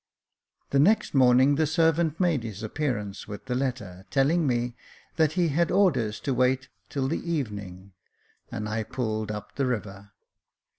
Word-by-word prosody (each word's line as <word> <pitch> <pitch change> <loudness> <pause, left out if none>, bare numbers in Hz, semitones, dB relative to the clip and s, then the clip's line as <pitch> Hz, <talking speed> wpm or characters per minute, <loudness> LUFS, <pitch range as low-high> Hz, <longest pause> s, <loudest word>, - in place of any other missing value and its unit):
The 140 - +3
next 205 +10 +3
morning 130 +1 +5
the 155 -1 +2
servant 160 0 +2
made 170 -7 +2
his 110 -2 -7
appearance 110 -5 -3
with 100 -1 -8
the 130 - -2
letter, 125 -8 -3
telling 145 +4 +2
me 120 -1 0 0.4
that 155 -2 +3
he 175 -2 +2
had 165 +4 +1
orders 130 - +2
to 135 - -1
wait 130 +1 +1 0.2
till 135 -3 -1
the - - -1
evening; 100 - -4 0.6
and 105 - -4
I 110 +1 -1
pulled 110 -2 -3
up 105 -1 -7
the 135 -2 +1
river. 100 -4 -4
130 Hz, 155 wpm, -26 LUFS, 105-150 Hz, 0.6 s, morning